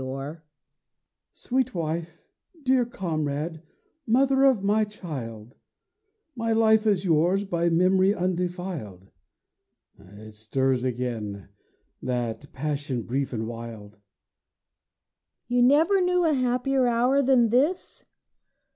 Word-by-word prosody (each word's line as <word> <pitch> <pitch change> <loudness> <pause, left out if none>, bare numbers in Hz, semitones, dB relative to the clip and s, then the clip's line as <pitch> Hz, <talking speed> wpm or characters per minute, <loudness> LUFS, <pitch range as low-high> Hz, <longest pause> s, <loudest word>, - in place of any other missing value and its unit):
HUSBAND 135 +5 -6 0.9
Sweet 255 -2 -2
wife, 165 0 -4 0.4
dear 260 -2 +3
comrade, 160 -6 -3 0.5
mother 270 +3 +3
of 255 -8 +3
my 210 +2 +3
child, 130 - -7 0.8
My 230 -1 -1
life 220 -1 +4
is 200 -2 +2
yours 175 +4 +2
by 170 -3 0
memory 185 +3 +3
undefiled. 180 - -4 0.9
(It 105 +3 -13
stirs 125 +4 -1
again, 115 -6 -4 0.5
that 125 +1 -3
passion 145 -4 -3
brief 135 +4 -2
and 110 -3 -3
wild.) 115 -3 -8
WIFE 105 -1 -31 1.5
You 245 0 +2
never 315 +10 +4
knew 360 -1 +2
a 315 - +3
happier 255 0 +1
hour 245 +4 +3
than 250 -4 +4
this? 290 +11 0
175 Hz, 105 wpm, -25 LUFS, -, 1.5 s, life